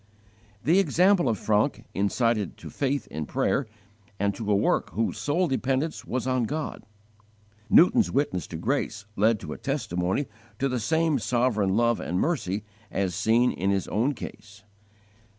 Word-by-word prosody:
The 170 +6 +4
example 180 -2 +3
of 110 - 0
Francke 110 +5 +1
incited 105 0 0
to - - -10
faith 140 0 -1
in 75 0 -4
prayer 135 0 0 0.5
and 100 +1 +1
to 105 +1 -3
a - - +4
work 100 - +1
whose 115 +1 -1
sole 170 +5 +1
dependence 135 +3 -1
was 125 0 -2
on 130 -2 +1
God. 150 +1 -4 0.8
Newton's 215 - +5
witness 130 - -1
to 80 - -6
grace 110 - -2
led 110 +1 +3
to 75 -4 -6
a - - -10
testimony 90 +10 -1 0.3
to 135 - +1
the 125 -2 -1
same 160 +5 +1
sovereign 115 -6 +1
love 120 0 +2
and 90 +2 -2
mercy 105 - -1 0.3
as 95 -2 -1
seen 110 +6 +3
in 95 +2 -1
his 100 -1 0
own 130 +7 +1
case. 105 -2 -10
115 Hz, 155 wpm, -26 LUFS, 100-140 Hz, 0.8 s, Newton's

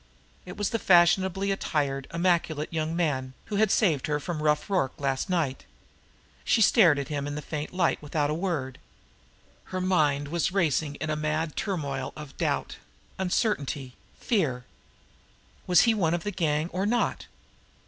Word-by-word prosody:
It 180 - -8
was 205 -2 -1
the 230 - 0
fashionably 190 +2 +4
attired, 140 -7 -1
immaculate 170 -3 0
young 160 0 -1
man, 130 -6 -1
who 205 - -3
had 215 0 +3
saved 165 - +2
her 150 -1 0
from 155 +1 -4
Rough 150 -1 +1
Rorke 180 -10 -1
last 135 +1 -1
night. 160 -7 -1 0.8
She - - +2
stared 190 -8 +5
at 140 - -4
him 145 -1 -3
in 145 - -4
the - - -3
faint 150 -1 -5
light 180 -2 +1
without 150 0 -1
a - - 0
word. 160 -7 -3 0.9
Her 185 - -4
mind 150 -6 +1
was 170 +2 0
racing 155 -6 0
in 155 +1 -3
a - - 0
mad 155 +1 -2
turmoil 140 -9 -3
of 150 -2 -10
doubt, - - -1 0.4
uncertainty, 155 - -1 0.3
fear. 145 - 0 1.0
Was 180 - +6
he 230 - +4
one 170 -6 +1
of 175 - -4
the 205 - -2
gang, 160 -3 0
or 190 +3 -1
not? 240 +2 0
160 Hz, 160 wpm, -27 LUFS, 145-185 Hz, 1.0 s, Was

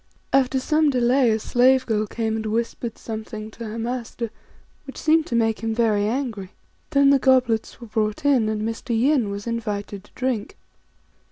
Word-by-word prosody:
After 265 -1 +3
some 305 +3 +2
delay 250 -1 +3
a 220 - +2
slave 255 +4 +3
girl 215 -2 0
came 220 0 -2
and 220 0 -3
whispered 230 +1 -3
something 220 -1 -7
to 230 +1 -8
her 215 +2 -6
master 235 -1 -4 0.6
which 270 - -9
seemed 320 0 +2
to 235 - -2
make 225 -1 +1
him 225 -1 -2
very 215 -3 +2
angry. 225 -6 -3 0.4
Then 280 -2 +4
the 280 - +5
goblets 255 -5 +2
were 240 - -9
brought 215 +2 -2
in, 255 -6 +3
and 215 -1 -2
Mr. 225 +1 -2
Yin 260 -4 +2
was 200 0 -5
invited 210 -3 -4
to - - -22
drink. 255 - -2
230 Hz, 175 wpm, -23 LUFS, 220-260 Hz, 0.6 s, the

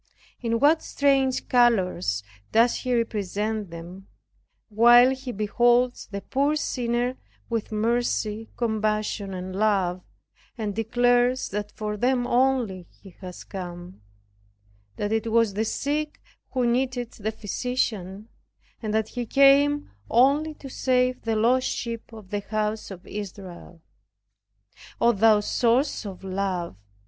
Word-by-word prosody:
In 230 -1 0
what 305 +4 +4
strange 270 -2 +1
colors 185 - +2 0.3
does 230 +2 +4
He 250 -1 -1
represent 215 -2 -2
them, 175 +4 -10 0.6
while 240 +4 +6
He 265 -1 -5
beholds 240 +4 +2
the 200 -1 -5
poor 280 +6 0
sinner 245 -3 -1 0.3
with 225 -2 -2
mercy, 225 -1 -1
compassion 215 -3 -1
and 185 +1 -6
love, 190 -4 +1 0.6
and 215 -3 -3
declares 245 +3 +2
that 205 +1 -4
for 210 -1 -4
them 245 +2 +1
only 245 -8 +1
He 195 -3 -17
was 180 -2 -8
come, 175 - -8 0.9
that 205 0 -3
it 225 0 -1
was 230 -2 +3
the 215 +3 -1
sick 300 +6 -2 0.3
who 255 -2 0
needed 245 0 0
the 215 +1 -4
physician; 215 -2 -3 0.5
and 215 -2 -2
that 220 0 0
He 245 -2 -5
came 280 +2 +4 0.2
only 285 +6 +3
to 275 - -10
save 255 -1 0
the 225 -1 -1
lost 245 +4 +2
sheep 230 -1 -5
of 215 -4 -12
the 205 - -1
house 215 +1 -3
of 185 -2 -10
Israel. 185 -4 -9 1.2
O 235 - +5
thou 215 0 +4
Source 240 +3 +1
of 195 -1 -9
Love! 185 - -3
225 Hz, 125 wpm, -25 LUFS, 200-250 Hz, 1.2 s, while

